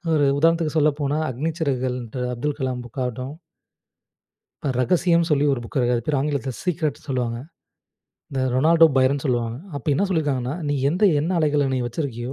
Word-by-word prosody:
ஒரு 145 Hz, -2 st, +3 dB
உதாரணத்துக்கு 165 Hz, 0 st, +2 dB
சொல்லப்போனா, 145 Hz, -1 st, +1 dB
"அக்னி 145 Hz, +7 st, -2 dB
சிறகுகள்" 130 Hz, -4 st, 0 dB
ன்ற 120 Hz, +3 st, -7 dB
அப்துல் 145 Hz, +4 st, -3 dB
கலாம் 130 Hz, -2 st, -2 dB
புக் 120 Hz, +3 st, -8 dB
ஆகட்டும் 125 Hz, +3 st, -4 dB, 1.3 s
இப்ப 140 Hz, -, 0 dB
ரகசியம், 170 Hz, +4 st, +3 dB
சொல்லி 145 Hz, -1 st, +3 dB
ஒரு 135 Hz, -, 0 dB
புக்க 120 Hz, +2 st, -1 dB
அது 120 Hz, -, 0 dB
பேரு, 145 Hz, -2 st, +1 dB
ஆங்கிலத்ல 140 Hz, -2 st, -1 dB
சீக்ரெட் 160 Hz, -4 st, -1 dB
சொல்லுவாங்க. 125 Hz, -4 st, -2 dB, 0.9 s
இந்த 135 Hz, -, -2 dB
ரொனால்டோ 165 Hz, +4 st, +6 dB
பைரன் 135 Hz, +2 st, +3 dB
சொல்லுவாங்க. 120 Hz, -3 st, 0 dB, 0.2 s
அப்ப 140 Hz, -, -8 dB
என்ன 175 Hz, +9 st, +2 dB
சொல்லியிருக்காங்கன்னா," 145 Hz, -6 st, -1 dB
நீ 145 Hz, -, +1 dB
எந்த, 175 Hz, +8 st, -2 dB, 0.2 s
எண்ண 165 Hz, +5 st, -1 dB
அலைகள 150 Hz, -3 st, +2 dB
நீ -, -, 0 dB
வச்சிருக்கியோ, 120 Hz, -1 st, -4 dB
140 Hz, 160 wpm, -23 LUFS, 125-155 Hz, 1.3 s, ரொனால்டோ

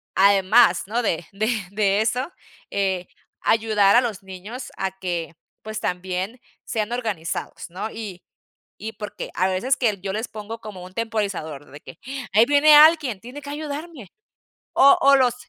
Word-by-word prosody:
además, 195 Hz, 0 st, +5 dB
¿no? 230 Hz, +4 st, 0 dB
De 175 Hz, -7 st, -1 dB
de 210 Hz, +2 st, -1 dB, 0.2 s
de 205 Hz, -1 st, +2 dB
eso, 250 Hz, +8 st, -1 dB, 0.4 s
eh, 190 Hz, -3 st, -1 dB, 0.3 s
ayudar 215 Hz, -3 st, +3 dB
a 245 Hz, -, +7 dB
los 225 Hz, -7 st, -4 dB
niños 190 Hz, +7 st, -8 dB
a 190 Hz, -1 st, -1 dB
que, 175 Hz, -3 st, -3 dB, 0.3 s
pues, 215 Hz, 0 st, -5 dB
también 185 Hz, +5 st, -3 dB, 0.3 s
sean 220 Hz, 0 st, -2 dB
organizados, 210 Hz, -13 st, -4 dB
¿no? 185 Hz, +5 st, -5 dB
Y 205 Hz, -5 st, -8 dB, 0.5 s
y 220 Hz, +2 st, -6 dB
porque 210 Hz, -1 st, -7 dB
a 185 Hz, -, +2 dB
veces 190 Hz, +9 st, +1 dB
que 215 Hz, -6 st, 0 dB
yo 195 Hz, +1 st, -4 dB
les 220 Hz, +4 st, -3 dB
pongo 220 Hz, +1 st, -8 dB
como 205 Hz, -4 st, -9 dB
un 185 Hz, +1 st, -12 dB
temporizador, 195 Hz, -11 st, -3 dB
de 145 Hz, -, -11 dB
que, -, -, -13 dB, 0.3 s
ahí 215 Hz, +3 st, +6 dB
viene 290 Hz, +3 st, +6 dB
alguien, 295 Hz, -, +6 dB
tiene 250 Hz, +5 st, -9 dB
que 285 Hz, -, -8 dB
ayudarme. 295 Hz, -, -6 dB, 0.6 s
O 275 Hz, +1 st, +7 dB
o 275 Hz, +1 st, +7 dB
los 250 Hz, -3 st, +3 dB
215 Hz, 160 wpm, -23 LUFS, 190-245 Hz, 0.6 s, a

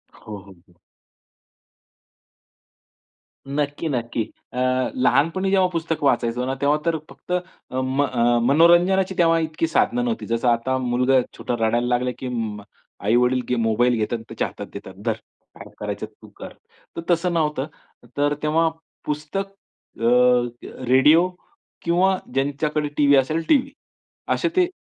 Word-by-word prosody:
हो, 105 Hz, -1 st, -9 dB
हो, 100 Hz, 0 st, -14 dB, 0.2 s
हो. 85 Hz, -, -27 dB, 2.7 s
नक्की, 145 Hz, +3 st, -2 dB
नक्की. 120 Hz, -3 st, -2 dB, 0.3 s
अ, -, -, -7 dB, 0.4 s
लहानपणी 160 Hz, +10 st, +2 dB
जेव्हा 190 Hz, -2 st, +4 dB
पुस्तक 165 Hz, -2 st, -2 dB
वाचायचो 120 Hz, -2 st, +1 dB
ना, 135 Hz, -, -1 dB
तेव्हा 145 Hz, +2 st, +3 dB
तर 165 Hz, -1 st, +1 dB
फक्त -, -, -13 dB
अ, 180 Hz, -, +1 dB, 0.4 s
म 130 Hz, +2 st, 0 dB, 0.5 s
मनोरंजनाची 175 Hz, +6 st, +4 dB
तेव्हा 165 Hz, -1 st, +4 dB
इतकी 160 Hz, +1 st, -1 dB
साधनं 245 Hz, +8 st, +1 dB
नव्हती. 230 Hz, -2 st, -2 dB
जसं 115 Hz, +2 st, -1 dB
आता 120 Hz, +3 st, +1 dB
मुलगा 125 Hz, +1 st, +2 dB, 0.2 s
छोटा -, -, -3 dB
रडायला 120 Hz, +2 st, +1 dB
लागला, 125 Hz, +1 st, +1 dB
की 130 Hz, -, -5 dB
अं, 110 Hz, -4 st, -3 dB, 0.4 s
आई-वडील 125 Hz, +3 st, +3 dB
गे 125 Hz, -, +2 dB
मोबाईल 115 Hz, +2 st, +2 dB
घेतात. 110 Hz, +2 st, -1 dB
त्याच्या -, -, -2 dB
हातात -, -, -9 dB
देतात. -, -, -9 dB
धर -, -, +2 dB, 0.5 s
काय -, -, -10 dB
करायचं -, -, -4 dB
तू -, -, -17 dB
कर. -, -, -9 dB, 0.4 s
तर 170 Hz, -, -2 dB
तसं 175 Hz, +1 st, +2 dB
नव्हतं. 150 Hz, -4 st, 0 dB, 0.5 s
तर 145 Hz, 0 st, +2 dB
तेव्हा 160 Hz, +2 st, +2 dB, 0.4 s
पुस्तक, 150 Hz, +6 st, -3 dB, 0.5 s
अ, -, -, -5 dB, 0.9 s
रेडिओ 150 Hz, +7 st, +5 dB, 0.5 s
किंवा 185 Hz, +3 st, +2 dB, 0.2 s
ज्यांच्याकडे 145 Hz, +2 st, -1 dB
टीव्ही 145 Hz, -1 st, +5 dB
असेल 155 Hz, +5 st, +1 dB
टीव्ही. 275 Hz, -1 st, +3 dB, 0.6 s
असे 340 Hz, -, 0 dB
ते 365 Hz, -1 st, +4 dB
145 Hz, 135 wpm, -22 LUFS, 125-165 Hz, 2.7 s, रेडिओ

